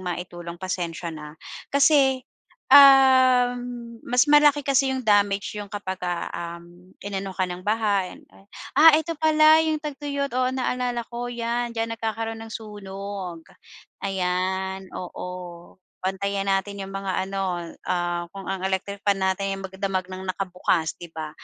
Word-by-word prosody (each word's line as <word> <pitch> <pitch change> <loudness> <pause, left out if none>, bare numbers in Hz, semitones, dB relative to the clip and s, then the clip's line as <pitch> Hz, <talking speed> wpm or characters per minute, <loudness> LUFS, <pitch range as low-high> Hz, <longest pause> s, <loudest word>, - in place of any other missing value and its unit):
maitulong 175 -1 -6
pasensya 175 -2 -3
na, 150 -2 -8 0.4
kasi, 275 -2 +4 0.5
um, 255 -3 +6
mas 250 +4 +3
malaki 295 0 +6
kasi 270 -1 +2
yung 260 - -2
damage 205 -1 +2
yung 205 -1 -7
kapagka, 185 -3 -3
um, 175 +2 -9
inano 195 -1 -4
ka 185 -1 -1
ng 180 +1 -7
baha 205 -3 +1
and - - -15
ay - - -19 0.3
ah, 325 +1 +9
ito 330 0 -5
pala 315 0 +5
yung 310 -1 0
tagtuyot 285 -1 -3
oo 255 0 +1
naalala 250 -2 -1
ko, 240 0 -5
'yan 235 0 -2
diyan 225 0 -2
nagkakaroon 225 0 -3
ng 225 - -10
sunog. 200 -4 -7 0.6
Ayan, 190 0 -2
oo, 180 0 -6 0.8
bantayan 195 +1 -1
natin 195 +1 -1
yung 195 - -7
mga 195 -1 -3 0.2
ano, 185 -3 -3 0.2
ah, 175 -1 -1
kung 195 -2 -8
ang 190 0 -2
electric 195 +1 -2
fan 195 -1 +2
natin 195 +1 -1
magdamag 190 -1 -3
ng 185 0 -7
nakabukas 180 -4 -1
'di 175 - -8
ba? 155 -1 -5
200 Hz, 140 wpm, -24 LUFS, 185-245 Hz, 0.8 s, ah